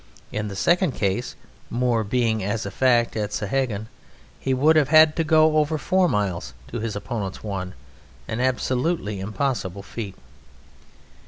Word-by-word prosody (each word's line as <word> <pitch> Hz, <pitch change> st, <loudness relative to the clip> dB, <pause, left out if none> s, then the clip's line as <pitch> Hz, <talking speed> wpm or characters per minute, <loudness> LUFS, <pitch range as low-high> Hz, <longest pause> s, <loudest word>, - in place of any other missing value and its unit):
In 105 Hz, 0 st, -2 dB
the 100 Hz, -, -6 dB
second 175 Hz, -, +2 dB
case 100 Hz, +4 st, -1 dB, 0.3 s
(Moore 120 Hz, -2 st, +1 dB
being 110 Hz, -1 st, 0 dB
as 105 Hz, +4 st, -2 dB
a -, -, -4 dB
fact 120 Hz, -3 st, +2 dB
at 105 Hz, -2 st, -1 dB
Sahagun) 110 Hz, 0 st, -1 dB, 0.5 s
he 135 Hz, -, -2 dB
would 145 Hz, +5 st, +4 dB
have 150 Hz, -3 st, +4 dB
had 155 Hz, 0 st, +7 dB
to 165 Hz, -, +2 dB
go 155 Hz, 0 st, +4 dB
over 155 Hz, +1 st, +2 dB
four 185 Hz, +3 st, +2 dB
miles 90 Hz, -, -2 dB
to 120 Hz, -, -4 dB
his 110 Hz, -1 st, -3 dB
opponent's 105 Hz, -2 st, -4 dB
one 95 Hz, -3 st, -4 dB, 0.5 s
an 110 Hz, -, -3 dB
absolutely 130 Hz, -, 0 dB
impossible 100 Hz, -2 st, -2 dB
feat. 100 Hz, -2 st, -6 dB
120 Hz, 150 wpm, -24 LUFS, 105-145 Hz, 0.5 s, had